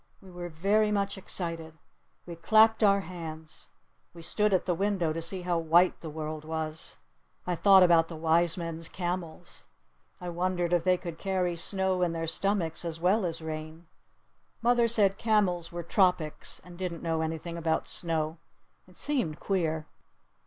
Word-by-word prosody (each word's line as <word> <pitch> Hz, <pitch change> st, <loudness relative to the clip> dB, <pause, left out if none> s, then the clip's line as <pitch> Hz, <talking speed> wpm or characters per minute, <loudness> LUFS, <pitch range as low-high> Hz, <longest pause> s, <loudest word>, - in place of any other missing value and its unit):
We 190 Hz, -2 st, -15 dB
were 175 Hz, 0 st, -6 dB
very 205 Hz, +6 st, +2 dB
much 200 Hz, -1 st, 0 dB
excited. 165 Hz, -4 st, -5 dB, 0.5 s
We 170 Hz, -, -7 dB
clapped 220 Hz, +6 st, +4 dB
our 200 Hz, -2 st, +5 dB
hands. 160 Hz, -3 st, -9 dB, 0.5 s
We 170 Hz, -, -10 dB
stood 210 Hz, +5 st, +1 dB
at 185 Hz, -, +2 dB
the 180 Hz, -, +1 dB
window 185 Hz, -3 st, 0 dB
to 165 Hz, -, -4 dB
see 180 Hz, +2 st, -4 dB
how 175 Hz, -1 st, 0 dB
white 170 Hz, +3 st, +3 dB
the 160 Hz, -, -6 dB
world 155 Hz, 0 st, -5 dB
was. 160 Hz, 0 st, -5 dB, 0.5 s
I 180 Hz, -, -1 dB
thought 190 Hz, +2 st, +7 dB
about 170 Hz, -2 st, +5 dB
the 165 Hz, -, -8 dB
wise 165 Hz, +2 st, +2 dB
men's 165 Hz, -1 st, -5 dB
camels. 175 Hz, -1 st, -5 dB, 0.6 s
I 180 Hz, -1 st, -5 dB
wondered 175 Hz, 0 st, -1 dB
if 175 Hz, -2 st, +2 dB
they 185 Hz, -1 st, +3 dB
could 170 Hz, -2 st, -7 dB
carry 185 Hz, -3 st, -1 dB
snow 190 Hz, +1 st, +1 dB
in 175 Hz, -2 st, +1 dB
their 165 Hz, 0 st, -3 dB
stomachs 165 Hz, 0 st, -1 dB
as 165 Hz, -1 st, -5 dB
well 185 Hz, +3 st, +2 dB
as 165 Hz, -1 st, -4 dB
rain. 155 Hz, +1 st, -6 dB, 0.8 s
Mother 240 Hz, 0 st, +4 dB
said 205 Hz, -4 st, +2 dB
camels 185 Hz, -7 st, +1 dB
were 175 Hz, 0 st, -5 dB
tropics 180 Hz, -4 st, 0 dB
and 175 Hz, 0 st, -13 dB
didn't 175 Hz, -3 st, -4 dB
know 165 Hz, -1 st, 0 dB
anything 160 Hz, +1 st, -4 dB
about 165 Hz, -1 st, -1 dB
snow. 160 Hz, -1 st, -1 dB, 0.5 s
It 180 Hz, -1 st, -17 dB
seemed 245 Hz, -, -1 dB
queer. 160 Hz, -5 st, -1 dB
175 Hz, 165 wpm, -29 LUFS, 160-190 Hz, 0.8 s, thought